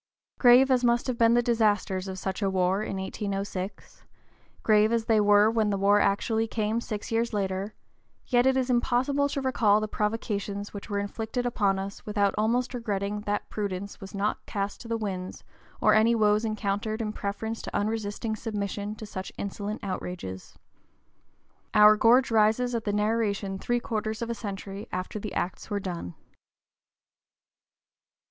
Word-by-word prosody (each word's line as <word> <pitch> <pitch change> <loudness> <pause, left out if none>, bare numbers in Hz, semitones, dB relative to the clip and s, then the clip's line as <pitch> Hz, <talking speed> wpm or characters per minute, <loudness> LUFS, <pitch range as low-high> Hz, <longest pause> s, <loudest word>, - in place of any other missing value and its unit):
Grave 255 +2 +7
as 255 -1 +3
must 240 0 +3
have 255 - -1
been 230 0 +5
the 240 - +3
disasters 210 -5 +1
of 190 0 -5
such 190 +2 -4
a 195 - +2
war 190 +1 +1
in 195 - -3
1806, 195 0 -5 0.6
grave 215 0 +4
as 230 -1 +1
they 220 -2 +3
were 205 0 +5
when 220 -2 +1
the 200 - 0
war 200 +1 +4
actually 220 +3 +1
came 220 +1 -1
six 215 -2 -5
years 230 +1 0
later, 195 +1 -2 0.5
yet 245 0 +3
it 265 0 +3
is 260 -1 +1
impossible 260 +4 +1
to 275 - -2
recall 230 -6 +3
the 215 - -2
provocations 210 -1 -3
which 205 +2 -8
were 205 - -1
inflicted 220 +4 -3
upon 205 -5 +1
us 195 +1 -6
without 205 -3 +1
almost 235 +5 +1
regretting 210 -3 -2
that 205 0 -1
prudence 200 -1 -4
was 195 +1 -9
not 200 +2 -1
cast 200 0 -3
to 235 - -10
the 230 0 -1
winds 190 -4 -5 0.4
and - - +6
any 225 +2 +4
woes 210 -1 +3
encountered 215 0 -2
in 215 -2 -2
preference 220 +3 -4
to - - -7
unresisting 215 +1 -2
submission 205 -1 -4
to 215 - -8
such 190 -2 -6
insolent 205 +2 -4
outrages. 180 - -6 1.2
Our 210 0 +8
gorge 240 +4 +4
rises 225 +3 +3
at 230 -2 -2
the 205 - 0
narration 210 -2 0
three 240 +3 0
quarters 220 -1 -3
of 235 - -3
a - - 0
century 200 -1 -6
after 185 +3 -4
the 210 0 -6
acts 180 - -3
were 205 -1 -1
done. 175 - -5
210 Hz, 165 wpm, -27 LUFS, 200-230 Hz, 1.2 s, Our